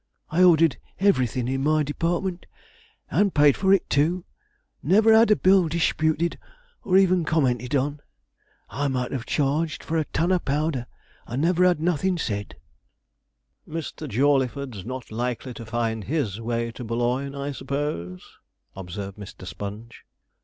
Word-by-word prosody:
I 170 +3 +2
ordered 165 -4 +5 0.2
everything 130 - +2
in 135 +1 -1
my 155 +1 +3
department, 175 +5 -2 0.6
and 200 -2 +2
paid 145 -2 +5
for 190 -1 +1
it 195 -2 +3
too; 165 +5 +1 0.6
and 150 - -3
never 220 +2 +6
had 225 0 +6
a 210 - +6
bill 185 -2 +4
disputed 160 0 0 0.4
or 185 -1 +3
even 185 -2 +4
commented 135 -4 0
on. 145 +2 0 0.7
I 145 +2 -1
might 125 -2 -2
have 130 -3 -4
charged 150 +3 0
for 160 0 -1
a 155 - -1
ton 170 +5 0
of 180 -2 +1
powder, 140 -3 -1 0.4
and 130 +6 -2
never 180 +1 +3
had 180 -4 +3
nothin' 175 +2 0
said.' 100 -9 -4 1.1
'Mr. 155 -1 -5
Jawleyford's 130 -3 0
not 130 -2 -6
likely 125 +2 -3
to 115 -1 -9
find 115 -2 -2
his 120 -8 -2
way 115 0 -2
to 125 - -8
Boulogne, 120 +4 -1
I 140 +1 -3
suppose?' 140 - -4 0.5
observed 95 +2 -7
Mr. 100 -2 -10
Sponge. 105 +6 -8
145 Hz, 145 wpm, -24 LUFS, 120-165 Hz, 1.1 s, never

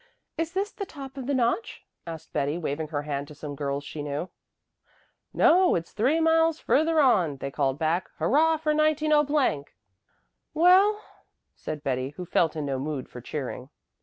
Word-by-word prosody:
"Is 330 +1 -3
this 395 +3 -1
the 400 -3 -6
top 275 -4 -9
of 265 -2 -6
the 285 - 0
notch?" 245 - -1 0.2
asked 165 -2 -8
Betty, 145 +3 0
waving 155 -1 -3
her 145 -1 -3
hand 145 -1 -4
to 150 - -12
some 145 0 -7
girls 140 0 -3
she 150 +1 -7
knew. 145 +4 -4 1.0
"No, 365 +2 +4
it's 170 -1 -3
three 260 +9 +1
miles 325 0 +3
further 320 +1 +2
on," 180 - +3
they 140 +1 -5
called 135 -2 0
back. 165 +3 0
"Hurrah 320 +3 +3
for 305 0 0
190 300 - +2 0.3
!" - - -46
"Well?" 375 +6 +5 0.6
said 150 -1 -6
Betty, 130 0 -2
who 180 - -5
felt 165 -1 +1
in 155 -2 -3
no 135 -2 -2
mood 140 -2 -4
for 125 - -10
cheering. 130 -1 -6
175 Hz, 170 wpm, -26 LUFS, -, 1.0 s, Well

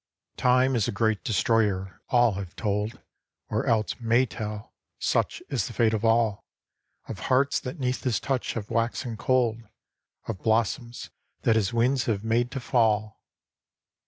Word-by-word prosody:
TIME 125 +1 +3
is 110 -4 +1
a - - -1
great 110 0 0
Destroyer 105 -5 +1
— - - -44
all 120 -3 +4
have 95 -2 -6
told, 105 0 -2 0.5
Or 110 +5 -1
else 115 -1 +1
may 120 +2 +3
tell 105 -2 -6 0.2
(such - - 0
is - - -1
the - - -8
fate 110 -2 +2
of 110 0 -1
all 115 -2 +2 0.3
!) - - -40
Of - - -6
hearts 135 +2 +3
that 125 +6 -6
'neath 125 -1 -1
his 125 -4 +1
touch 135 -3 -2
have 110 -2 -6
waxen 115 +1 -1
cold, 120 -1 +1 0.7
Of 105 -5 -5
blossoms 115 +2 -1 0.3
that 115 - +3
his 110 -1 +1
winds 120 +3 +2
have 105 -3 -1
made 115 +2 +1
to 135 - -4
fall 110 -3 +1
115 Hz, 160 wpm, -26 LUFS, 110-125 Hz, 0.7 s, all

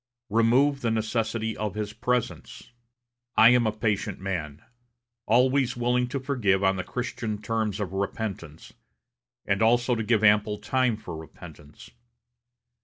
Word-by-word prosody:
Remove 130 +6 +3
the 115 - 0
necessity 110 0 -1
of 105 -3 -4
his 105 -1 -4
presence.... 125 +1 -3 0.7
I 110 - +8
am 120 -2 +4
a - - +1
patient 105 -2 -2
man 85 -6 -5 0.6
always 130 0 +2
willing 125 +1 +1
to 135 +3 -3
forgive 115 -8 0
on 95 0 +3
the 95 - -3
Christian 115 -2 -4
terms 110 -1 -2
of 95 -3 -4
repentance, 95 -5 -5 0.7
and 100 0 0
also 120 +2 +3
to 115 - -1
give 110 0 +1
ample 105 0 +4
time 120 +2 0
for 105 -6 -8
repentance. 75 -2 -13
110 Hz, 135 wpm, -26 LUFS, 100-120 Hz, 0.7 s, I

